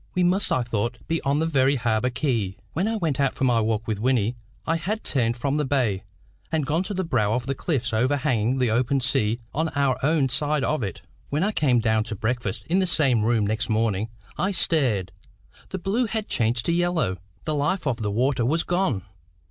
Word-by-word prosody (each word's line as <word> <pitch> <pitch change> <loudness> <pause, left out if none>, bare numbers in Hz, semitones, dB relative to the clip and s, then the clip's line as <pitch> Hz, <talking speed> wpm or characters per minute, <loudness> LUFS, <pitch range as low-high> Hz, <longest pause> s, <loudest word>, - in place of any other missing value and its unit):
We 180 - +2
must, 185 +3 +2
I 130 - +2
thought, 120 0 -2
be 165 0 0
on 140 +1 +1
the 160 - +1
very 140 -3 +3
harbour 115 -1 +1
quay. 115 -8 -1 0.2
When 185 +6 0
I 225 - 0
went 160 - -1
out 140 -2 +1
for - - -3
my 120 -3 +3
walk 110 0 0
with 110 -3 -2
Wynnie, 120 -1 +1 0.3
I 165 - +1
had 210 +7 -3
turned 120 -3 0
from 140 +4 0
the 150 - +1
bay, 125 -9 0 0.5
and 160 -3 0
gone 155 +5 +1
to 205 - -4
the 190 - 0
brow 105 - +1
of 120 +1 -1
the 135 - -1
cliffs 130 -5 -2
overhanging 130 -1 +1
the 125 -3 +1
open 125 +4 +2
sea 115 -2 +1
on 160 +3 0
our 140 -3 +1
own 150 -1 +3
side 145 +2 0
of 150 +3 0
it. 95 -2 -5 0.3
When 150 +4 0
I 205 - +1
came 135 - +2
down 110 -1 +2
to 110 - -4
breakfast 110 -1 -2
in 180 +4 +2
the 190 - +2
same 135 -9 +3
room 110 -1 +2
next 110 +4 -1
morning, 110 -1 0 0.3
I 190 - +2
stared. 120 - +2 0.6
The 190 - -4
blue 205 +7 0
had 220 0 -3
changed 120 +1 +1
to - - +1
yellow. 170 - +1 0.3
The 155 - -1
life 150 +6 0
of 130 -5 0
the 110 -4 -2
water 125 +4 +1
was 155 +8 +1
gone. 175 - 0
130 Hz, 215 wpm, -24 LUFS, 115-160 Hz, 0.6 s, very